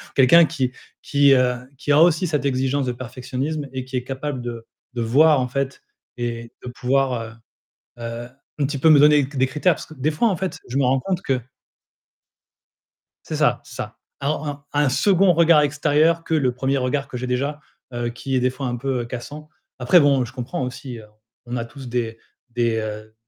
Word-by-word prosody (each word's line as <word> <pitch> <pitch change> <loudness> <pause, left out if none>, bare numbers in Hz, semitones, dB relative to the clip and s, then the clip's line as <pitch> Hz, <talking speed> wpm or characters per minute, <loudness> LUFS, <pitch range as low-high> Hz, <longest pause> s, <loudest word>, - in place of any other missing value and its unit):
quelqu'un 160 +6 +7
qui 130 -6 -2 0.3
qui, 140 -1 +4
heu, 125 -1 +3 0.2
qui 145 - -2
a 150 +2 +6
aussi 175 +1 +4
cette 150 -3 -1
exigence 135 +1 0
de 125 - -1
perfectionnisme 130 +4 -4
et 130 -1 -4
qui 130 0 -7
est 125 - -2
capable 135 0 -4
de 115 -1 -6 0.3
de 120 - -3
voir, 145 +6 +5
en 125 - 0
fait 140 +1 -3 0.4
et 115 -1 -4
de - - -8
pouvoir, 135 +2 +1
heu, 115 0 -8 0.7
heu, 115 +1 -5 0.3
un 145 - +2
petit 140 0 -4
peu 160 - +4
me 150 - +8
donner 150 0 +6
c 140 - -10
des 130 - +4
critères 155 +5 +2
parce - - -9
que 155 - -13
des 145 +2 0
fois, 160 +10 +2
en 190 - 0
fait, 190 +1 -4
je 125 - -4
me 135 - +2
rends 130 +1 +2
compte 185 +3 -2
que 130 -6 0 1.8
C'est - - -5
ça, - - +2
c'est - - -13
ça, - - -6 0.2
un 145 0 -3
un 145 - +1
un 145 - +3
2nd 190 +6 +4
regard 165 -2 +5
extérieur 150 +3 +2
que - - -3
le 135 -6 +2
1er 135 +2 0
regard 135 +2 -1
que 125 - -6
j'ai 125 +1 -4
déjà, 140 +4 -1 0.3
heu, 120 0 -2
qui 130 +3 -4
est, - - +3
des 125 +1 +2
fois, 130 +1 -5
un 120 0 -2
peu, 130 0 -2
heu, - - -5
cassant. 145 +6 -8 0.3
Après 130 +9 +5
bon, 140 -4 +3
je 120 - -12
comprends 130 0 -4
aussi, 125 0 -6
heu, 110 - -12 0.4
on 120 +1 -4
a 115 - -3
tous 135 +1 -11
des 115 -2 -2 0.3
des, 115 -1 0
heu 110 0 -5
135 Hz, 210 wpm, -22 LUFS, 125-150 Hz, 1.8 s, me